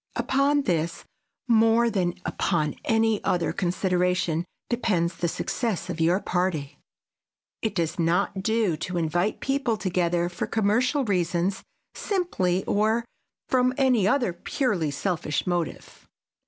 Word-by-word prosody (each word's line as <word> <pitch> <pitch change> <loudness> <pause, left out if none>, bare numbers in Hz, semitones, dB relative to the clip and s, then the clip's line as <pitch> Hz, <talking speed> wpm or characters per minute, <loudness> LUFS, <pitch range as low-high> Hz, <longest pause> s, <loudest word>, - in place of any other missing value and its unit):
Upon 280 +2 +2
this 170 - -1 0.4
more 230 0 +4
than 180 -4 0
upon 155 -5 0
any 225 -1 +2
other 175 - 0
consideration 180 -2 0 0.2
depends 180 -8 0
the 170 - -1
success 185 0 -2
of 165 -1 -4
your 175 +4 +3
party. 175 -7 -2 0.8
It 220 - -2
does 170 -1 -1
not 180 +3 +1
do 220 -4 +1
to 175 +2 -4
invite 175 +5 0
people 270 -5 0
together 175 -3 0
for 175 - -4
commercial 240 +6 +1
reasons 180 -1 0 0.3
simply 190 - -1
or 220 +3 +1 0.4
from 255 0 +2
any 250 -8 +3
other 240 -5 +2
purely 180 - -1
selfish 150 0 -2
motive. 175 -3 -4
185 Hz, 120 wpm, -25 LUFS, 175-225 Hz, 0.8 s, more